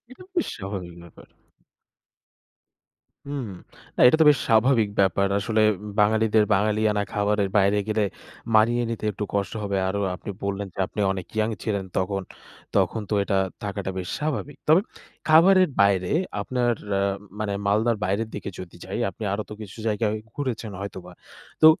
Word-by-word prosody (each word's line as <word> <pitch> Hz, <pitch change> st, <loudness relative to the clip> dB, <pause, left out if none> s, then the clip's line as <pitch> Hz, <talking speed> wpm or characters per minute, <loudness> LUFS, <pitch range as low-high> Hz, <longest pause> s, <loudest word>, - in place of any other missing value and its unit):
এটা 370 Hz, +9 st, -13 dB
বেশ 350 Hz, -3 st, 0 dB
স্বাভাবিক 95 Hz, -3 st, -6 dB
ব্যাপার। 85 Hz, -, -15 dB, 2.0 s
হুম। 140 Hz, -5 st, -3 dB, 0.5 s
না -, -, -2 dB
এটা 140 Hz, -, +4 dB
তো -, -, +7 dB
বেশ 145 Hz, -, +3 dB
স্বাভাবিক 115 Hz, -1 st, +4 dB
ব্যাপার। 100 Hz, 0 st, +3 dB
আসলে 110 Hz, +2 st, 0 dB, 0.2 s
উম 105 Hz, -, -7 dB
বাঙালিদের 110 Hz, +1 st, +4 dB
বাঙালিয়ানা 105 Hz, +1 st, +1 dB
খাবারের 105 Hz, -1 st, +1 dB
বাইরে 100 Hz, +1 st, +4 dB
গেলে 110 Hz, -1 st, +1 dB, 0.5 s
মানিয়ে 120 Hz, +3 st, +4 dB
নিতে 110 Hz, -1 st, -4 dB
একটু 105 Hz, -, -4 dB
কষ্ট 100 Hz, -3 st, -1 dB
হবে। 100 Hz, -1 st, -1 dB
আরো 100 Hz, +1 st, -1 dB
আপনি 90 Hz, -, -7 dB
বললেন 100 Hz, 0 st, -2 dB
যে -, -, -15 dB
আপনি 105 Hz, -, -6 dB
অনেক 95 Hz, -2 st, -6 dB
ইয়ং 110 Hz, +1 st, +1 dB
ছিলেন 100 Hz, -4 st, -1 dB
তখন, 95 Hz, +1 st, -1 dB, 0.5 s
তখন 110 Hz, -, +2 dB
তো -, -, +1 dB
এটা 100 Hz, -, 0 dB, 0.3 s
থাকাটা 100 Hz, -1 st, -3 dB
বেশ 90 Hz, -, -5 dB
স্বাভাবিক। 150 Hz, -1 st, -3 dB
তবে 160 Hz, +4 st, +7 dB, 0.5 s
খাবারের 185 Hz, +3 st, +6 dB
বাইরে 95 Hz, -2 st, +3 dB, 0.3 s
আপনার 125 Hz, -2 st, 0 dB, 0.2 s
অ্যা 100 Hz, -, +1 dB, 0.4 s
মানে 105 Hz, -1 st, -2 dB
মালদার 110 Hz, +3 st, +2 dB
বাইরের 100 Hz, +4 st, -1 dB
দিকে 100 Hz, -, -5 dB
যদি 85 Hz, -2 st, -9 dB
যাই, 95 Hz, +4 st, -4 dB
আপনি -, -, -12 dB
আরো 105 Hz, -, -1 dB
তো -, -, -8 dB
কিছু 105 Hz, +2 st, -10 dB
জায়গায় 105 Hz, 0 st, 0 dB, 0.2 s
ঘুরেছেন 120 Hz, -6 st, -3 dB
হয়তোবা। 95 Hz, -2 st, -7 dB, 0.5 s
তো -, -, +10 dB
105 Hz, 155 wpm, -24 LUFS, 100-115 Hz, 2.0 s, তো